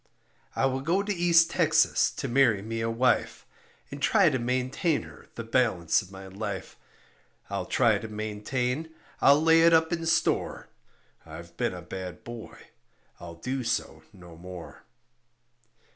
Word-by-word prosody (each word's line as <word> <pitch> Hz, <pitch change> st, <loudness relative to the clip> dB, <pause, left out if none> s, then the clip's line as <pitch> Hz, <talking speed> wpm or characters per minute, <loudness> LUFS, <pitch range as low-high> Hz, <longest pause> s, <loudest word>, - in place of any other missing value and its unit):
I -, -, +1 dB
will 135 Hz, 0 st, 0 dB
go 175 Hz, +8 st, +1 dB
to 205 Hz, 0 st, -2 dB
East 170 Hz, -2 st, +4 dB
Texas -, -, +3 dB
to -, -, -4 dB
marry 120 Hz, -6 st, +3 dB
me 115 Hz, +1 st, -4 dB
a 115 Hz, -, -1 dB
wife, 120 Hz, +2 st, 0 dB, 0.5 s
And -, -, -8 dB
try -, -, +4 dB
to 130 Hz, -, -1 dB
maintain 130 Hz, +6 st, -1 dB
her -, -, -14 dB
the 115 Hz, -, -5 dB
balance 110 Hz, -8 st, +1 dB
of 95 Hz, -, -14 dB
my 95 Hz, 0 st, -10 dB
life; 95 Hz, +1 st, -6 dB, 0.8 s
I'll -, -, -3 dB
try -, -, +2 dB
to 110 Hz, -, -7 dB
maintain; 115 Hz, +7 st, -3 dB, 0.3 s
I'll 140 Hz, +1 st, +6 dB
lay 165 Hz, +1 st, +5 dB
it 165 Hz, 0 st, +6 dB
up 160 Hz, +1 st, +3 dB
in 165 Hz, -1 st, -3 dB
store 165 Hz, -, 0 dB, 0.5 s
I've 85 Hz, +2 st, -11 dB
been 90 Hz, -, -1 dB
a 90 Hz, -, -9 dB
bad 90 Hz, 0 st, -8 dB
boy, 120 Hz, -1 st, -9 dB, 0.6 s
I'll 85 Hz, -1 st, -9 dB
do 130 Hz, +10 st, -4 dB
so 115 Hz, -, -2 dB
no 90 Hz, -4 st, -14 dB
more. 90 Hz, 0 st, -11 dB
120 Hz, 155 wpm, -27 LUFS, 95-145 Hz, 0.8 s, I'll